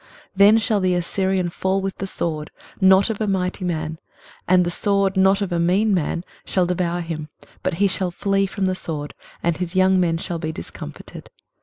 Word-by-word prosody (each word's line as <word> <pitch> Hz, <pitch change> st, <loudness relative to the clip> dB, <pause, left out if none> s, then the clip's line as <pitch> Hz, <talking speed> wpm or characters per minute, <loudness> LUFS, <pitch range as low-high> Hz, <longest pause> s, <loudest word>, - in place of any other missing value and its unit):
23:031:008 -, -, -25 dB, 0.3 s
Then 205 Hz, +3 st, +7 dB
shall 220 Hz, -1 st, +1 dB
the 185 Hz, -1 st, +1 dB
Assyrian 185 Hz, +1 st, 0 dB
fall 190 Hz, +3 st, 0 dB
with 195 Hz, 0 st, -4 dB
the 195 Hz, -, -3 dB
sword, 155 Hz, -5 st, -3 dB, 0.3 s
not 190 Hz, +3 st, +5 dB
of 220 Hz, -, -5 dB
a 215 Hz, -, 0 dB
mighty 185 Hz, -1 st, -1 dB
man; 160 Hz, -2 st, -3 dB, 0.5 s
and 180 Hz, 0 st, +4 dB
the 175 Hz, -, -1 dB
sword, 200 Hz, +1 st, +1 dB
not 190 Hz, +1 st, +4 dB
of 195 Hz, -, -4 dB
a 170 Hz, -, 0 dB
mean 195 Hz, +5 st, +2 dB
man, 170 Hz, -1 st, -1 dB, 0.2 s
shall 185 Hz, -2 st, +1 dB
devour 175 Hz, 0 st, -1 dB
him: 160 Hz, -2 st, -5 dB, 0.3 s
but 185 Hz, -, -1 dB
he 200 Hz, +4 st, +3 dB
shall 190 Hz, -1 st, 0 dB
flee 195 Hz, +2 st, 0 dB
from 195 Hz, 0 st, -2 dB
the 185 Hz, -, +1 dB
sword, 150 Hz, -5 st, -5 dB, 0.3 s
and 170 Hz, -1 st, +1 dB
his 180 Hz, 0 st, -4 dB
young 185 Hz, 0 st, +4 dB
men 170 Hz, -2 st, +2 dB
shall 170 Hz, 0 st, -4 dB
be 160 Hz, -1 st, -3 dB
discomfited. 85 Hz, -, -9 dB
185 Hz, 200 wpm, -22 LUFS, 170-195 Hz, 0.5 s, Then